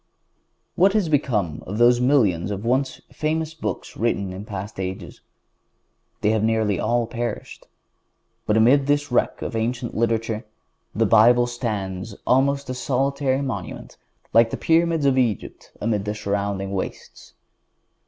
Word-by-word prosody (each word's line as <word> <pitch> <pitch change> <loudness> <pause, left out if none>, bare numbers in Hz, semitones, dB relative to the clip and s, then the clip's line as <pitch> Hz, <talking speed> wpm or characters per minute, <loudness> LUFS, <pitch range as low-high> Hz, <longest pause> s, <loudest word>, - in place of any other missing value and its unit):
What 195 +2 +4
has 205 -6 +1
become 105 - 0
of 105 - -4
those 120 +1 +5
millions 110 - +2
of 100 +1 -4
once 130 +3 0
famous 160 +1 -2
books 110 - -5
written 100 -4 -1
in 95 +3 -7
past 100 0 -7
ages? 95 0 -6 1.0
They 105 - +3
have 110 -1 +1
nearly 110 -3 +1
all 120 +1 +1
perished. 115 -1 -5 0.8
But 105 - +3
amid 135 +5 +4
this 145 -1 +1
wreck 125 - 0
of - - -4
ancient 120 +2 -2
literature, 115 -1 0 0.5
the - - +2
Bible 120 +3 +5
stands 105 -5 -4
almost 140 +2 +2
a 130 - -3
solitary 135 +1 0
monument 110 -10 -6 0.4
like 115 0 +6
the - - -4
Pyramids 165 -2 +2
of 135 -1 +3
Egypt 115 -6 -2
amid 105 -2 -1
the 105 0 -2
surrounding 100 -2 -2
wastes. 95 -1 -6
115 Hz, 140 wpm, -23 LUFS, 105-135 Hz, 1.0 s, like